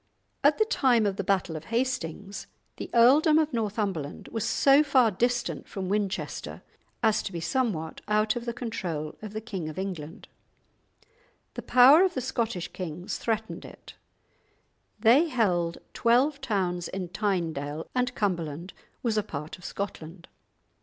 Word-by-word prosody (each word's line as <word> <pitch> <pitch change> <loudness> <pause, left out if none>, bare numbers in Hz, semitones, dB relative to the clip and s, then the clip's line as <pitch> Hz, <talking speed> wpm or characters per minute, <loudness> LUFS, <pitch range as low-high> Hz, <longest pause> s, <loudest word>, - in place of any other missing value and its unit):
At - - +5
the 435 - +3
time 250 - +3
of 195 -1 -1
the 200 - -2
battle 185 -4 0
of 155 0 -7
Hastings, 215 -5 -3 0.3
the - - -6
earldom 290 +7 +6
of 310 -2 +1
Northumberland 205 -9 -3
was 225 -3 -3
so 275 +1 +5
far 260 -6 +4
distant 245 +5 -1
from 190 -3 -4
Winchester 200 -1 -3 0.4
as 220 -1 +3
to - - -5
be 170 - -4
somewhat 165 -2 -2
out 215 +1 +2
of 240 0 -4
the 235 - -1
control 175 - -4
of 215 -1 -8
the 215 - -4
King 190 -8 -5
of 155 - -9
England; 180 -5 -6 1.3
the - - -5
power 260 +6 +7
of 375 - +1
the - - 0
Scottish 230 -8 -2
kings 180 0 -5
threatened 220 -1 -2
it; - - -12 1.1
they 245 +9 +5
held 180 - +1 0.2
twelve 265 +5 +2
towns 185 -8 -1
in 185 -2 -5
Tynedale, 165 -7 -2
and 250 0 0
Cumberland 170 -4 -2 0.3
was 225 -3 +1
a - - -2
part 150 -2 -7
of - - -17
Scotland. 175 -3 -6
210 Hz, 150 wpm, -27 LUFS, 175-240 Hz, 1.3 s, power